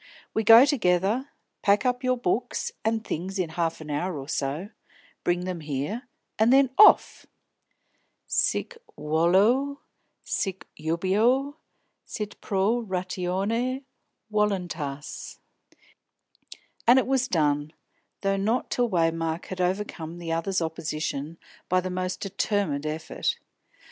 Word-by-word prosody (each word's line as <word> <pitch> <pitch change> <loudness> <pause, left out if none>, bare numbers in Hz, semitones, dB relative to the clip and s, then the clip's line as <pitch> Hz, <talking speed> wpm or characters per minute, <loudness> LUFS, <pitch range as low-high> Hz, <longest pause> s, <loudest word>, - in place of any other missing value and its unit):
We 220 - 0
go 225 +4 +9
together, 220 - +1 0.3
pack 205 +4 +3
up 250 0 0
your 255 0 +2
books 240 +2 -1
and 220 0 0
things 185 +5 -4
in 180 -4 -1
half 165 0 -2
an 150 -1 -7
hour 170 +3 -2
or 135 -1 -7
so, 150 +6 -2 0.5
bring 175 0 +1
them 185 -2 -3
here, 155 - -4 0.3
and 220 +2 +5
then 270 -1 +5
off! 425 - +6 1.0
Sic 480 -1 0 0.2
volo, 195 - +2 0.4
sic 190 -2 -3
jubeo, 210 - +1 0.5
sit 210 -1 -6
pro 205 +5 +1
ratione 195 +7 -2 0.5
voluntas!" 175 -9 -2 1.5
And 245 +2 +8
it 260 - +3
was 260 -1 +1
done, 150 - +1 0.5
though 195 0 +1
not 220 +6 0
till 245 -1 +1
Waymark 165 -2 0
had 185 -1 -5
overcome 180 -3 -2
the 170 -1 -5
other's 170 +2 0
opposition 155 -1 -4 0.3
by 185 - +3
the 185 0 -4
most 185 0 -3
determined 190 -7 -1
effort. 155 +1 -2
190 Hz, 120 wpm, -26 LUFS, 165-225 Hz, 1.5 s, go